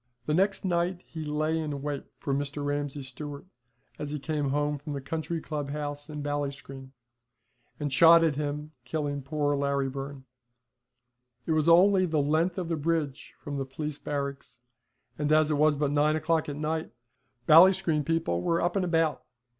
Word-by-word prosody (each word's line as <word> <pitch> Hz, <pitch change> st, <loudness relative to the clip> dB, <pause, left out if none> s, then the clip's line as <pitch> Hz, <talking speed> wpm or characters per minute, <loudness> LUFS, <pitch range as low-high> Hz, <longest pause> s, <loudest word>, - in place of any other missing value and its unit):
The 150 Hz, -, 0 dB
next 195 Hz, +4 st, +1 dB
night 175 Hz, 0 st, 0 dB
he 160 Hz, -1 st, -7 dB
lay 155 Hz, +2 st, 0 dB
in 145 Hz, -3 st, -4 dB
wait 145 Hz, -2 st, -3 dB
for 140 Hz, -, -3 dB
Mr. 145 Hz, +1 st, -2 dB
Ramsay 145 Hz, -1 st, -2 dB
Stewart 140 Hz, +3 st, -8 dB, 0.5 s
as 150 Hz, -, -4 dB
he 150 Hz, -, -3 dB
came 145 Hz, -1 st, -2 dB
home 145 Hz, +1 st, 0 dB
from 150 Hz, +1 st, -6 dB
the 140 Hz, -, -3 dB
county 160 Hz, +4 st, -3 dB
club 150 Hz, -3 st, -4 dB
house 145 Hz, 0 st, -5 dB
in 150 Hz, -1 st, -5 dB
Ballinscreen, 140 Hz, -2 st, -4 dB, 0.9 s
and 145 Hz, -2 st, -2 dB
shot 165 Hz, +3 st, +7 dB
at 160 Hz, -3 st, +3 dB
him, 150 Hz, +1 st, -3 dB
killing 145 Hz, +2 st, -3 dB
poor 145 Hz, +1 st, 0 dB
Larry 140 Hz, -1 st, 0 dB
Byrne. 135 Hz, 0 st, -7 dB, 1.2 s
It -, -, -2 dB
was 155 Hz, +1 st, +3 dB
only 185 Hz, +2 st, +6 dB
the 160 Hz, -2 st, -1 dB
length 160 Hz, +6 st, +1 dB
of 180 Hz, -3 st, -2 dB
the 165 Hz, -, -1 dB
bridge 155 Hz, -2 st, -2 dB
from 145 Hz, -2 st, -5 dB
the 135 Hz, -, -2 dB
police 150 Hz, +2 st, -5 dB
barracks, 140 Hz, -3 st, -5 dB, 0.6 s
and 150 Hz, 0 st, 0 dB
as 155 Hz, 0 st, +4 dB
it 150 Hz, -, +1 dB
was 155 Hz, 0 st, +4 dB
but 145 Hz, 0 st, 0 dB
nine 150 Hz, +1 st, +3 dB
o'clock 155 Hz, 0 st, 0 dB
at 145 Hz, -, -4 dB
night, 155 Hz, +2 st, -2 dB, 0.5 s
Ballinscreen 165 Hz, -1 st, +6 dB
people 160 Hz, -, 0 dB
were 170 Hz, -, +1 dB
up 175 Hz, +2 st, 0 dB
and 195 Hz, -, +1 dB
about. 165 Hz, -3 st, +1 dB
150 Hz, 175 wpm, -28 LUFS, 140-160 Hz, 1.2 s, shot